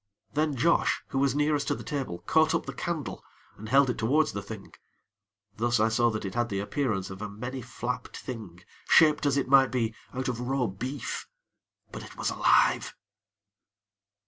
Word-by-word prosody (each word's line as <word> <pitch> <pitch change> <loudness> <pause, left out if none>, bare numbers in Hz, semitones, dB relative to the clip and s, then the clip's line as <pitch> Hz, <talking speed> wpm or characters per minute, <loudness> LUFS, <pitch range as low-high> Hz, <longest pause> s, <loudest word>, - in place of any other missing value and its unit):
Then 150 -1 +1
Josh, 165 +7 +2
who 135 - -1
was 135 -1 +2
nearest 150 -1 +1
to - - +1
the - - -8
table, 135 -12 -4
caught - - +3
up - - -1
the - - -5
candle, - - -4 0.3
and 110 +1 -9
held 140 +3 +5
it 125 - -2
towards 140 +7 +2
the 100 -1 -4
Thing; 100 0 -9 0.8
thus 120 +1 +1
I 110 +1 +4
saw 120 +1 +3
that 110 -2 -3
it 95 - -4
had 120 0 0
the 100 - -2
appearance 105 -3 -1
of 95 +1 -8
a 105 - -4
many 125 +6 -6
flapped 125 +1 -5
thing 100 -8 -8 0.2
shaped 150 -2 +5
as 140 - +2
it 140 - 0
might 135 -1 +6
be, 115 -3 0 0.2
out 130 0 -3
of 120 -2 -2
raw 125 +1 0
beef 125 +8 -4 0.6
but - - -7
it - - -12
was - - -1
alive. - - +3
125 Hz, 185 wpm, -28 LUFS, 110-140 Hz, 0.8 s, might